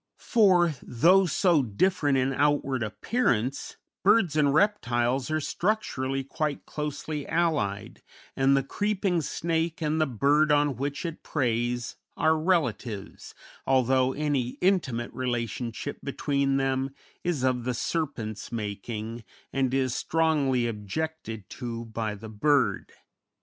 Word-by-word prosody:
For, 185 Hz, -8 st, +4 dB
though 180 Hz, +10 st, +4 dB
so 170 Hz, -1 st, +3 dB
different 145 Hz, -, +1 dB
in 130 Hz, +1 st, +1 dB
outward 140 Hz, -2 st, +1 dB
appearance, 125 Hz, -, -1 dB, 0.3 s
birds 190 Hz, -6 st, +4 dB
and 145 Hz, -2 st, +3 dB
reptiles 130 Hz, -, +1 dB
are 155 Hz, 0 st, +1 dB
structurally 140 Hz, -7 st, -1 dB
quite 145 Hz, +2 st, -3 dB
closely 150 Hz, 0 st, -4 dB
allied, 155 Hz, -13 st, -1 dB, 0.3 s
and 135 Hz, +1 st, +4 dB
the 135 Hz, -, +1 dB
creeping 195 Hz, +2 st, 0 dB
snake 165 Hz, +2 st, -1 dB
and 155 Hz, 0 st, 0 dB
the 155 Hz, -, +3 dB
bird 145 Hz, +5 st, +3 dB
on 145 Hz, -2 st, +3 dB
which 140 Hz, +6 st, -3 dB
it 165 Hz, -1 st, -5 dB
preys 120 Hz, -3 st, -1 dB, 0.2 s
are 160 Hz, 0 st, +3 dB
relatives, 130 Hz, -, -2 dB, 0.3 s
although 130 Hz, 0 st, +3 dB
any 140 Hz, -5 st, -1 dB
intimate 135 Hz, -11 st, +1 dB
relationship 120 Hz, +1 st, -3 dB
between 140 Hz, -1 st, 0 dB
them 135 Hz, 0 st, -1 dB, 0.3 s
is 170 Hz, -7 st, -1 dB
of 130 Hz, -2 st, +1 dB
the 125 Hz, 0 st, -1 dB
serpent's 115 Hz, -9 st, -3 dB
making, 110 Hz, +1 st, -5 dB, 0.3 s
and 135 Hz, -2 st, +1 dB
is 130 Hz, -2 st, +1 dB
strongly 145 Hz, -5 st, +1 dB
objected 115 Hz, 0 st, -4 dB
to 115 Hz, -2 st, -5 dB
by 110 Hz, -2 st, -3 dB
the 110 Hz, +2 st, -9 dB
bird. 140 Hz, +6 st, +1 dB
135 Hz, 120 wpm, -27 LUFS, 120-160 Hz, 0.3 s, For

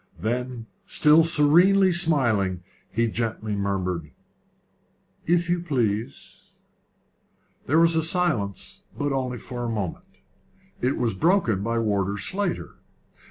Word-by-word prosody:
Then, 120 Hz, +3 st, -3 dB, 0.2 s
still 155 Hz, +2 st, +5 dB
serenely 175 Hz, +5 st, +4 dB
smiling, 120 Hz, -, +1 dB, 0.3 s
he 115 Hz, +1 st, +1 dB
gently 110 Hz, -2 st, -3 dB
murmured, 95 Hz, -5 st, -2 dB, 1.2 s
"If 170 Hz, 0 st, +2 dB
you 175 Hz, 0 st, +1 dB
please." 120 Hz, -9 st, -3 dB, 1.2 s
There 150 Hz, -, +2 dB
still 165 Hz, -1 st, +2 dB
was 160 Hz, 0 st, 0 dB
silence, 155 Hz, -, -2 dB, 0.2 s
but 145 Hz, -1 st, -1 dB
only 130 Hz, -2 st, -2 dB
for 120 Hz, 0 st, -7 dB
a 120 Hz, -, -2 dB
moment. 105 Hz, -6 st, -6 dB, 0.6 s
It 130 Hz, +2 st, 0 dB
was 115 Hz, -4 st, 0 dB
broken 120 Hz, -, +1 dB
by 115 Hz, +3 st, -1 dB
Warder 100 Hz, -3 st, 0 dB
Slater. 185 Hz, -, -3 dB
125 Hz, 115 wpm, -24 LUFS, 105-165 Hz, 1.2 s, still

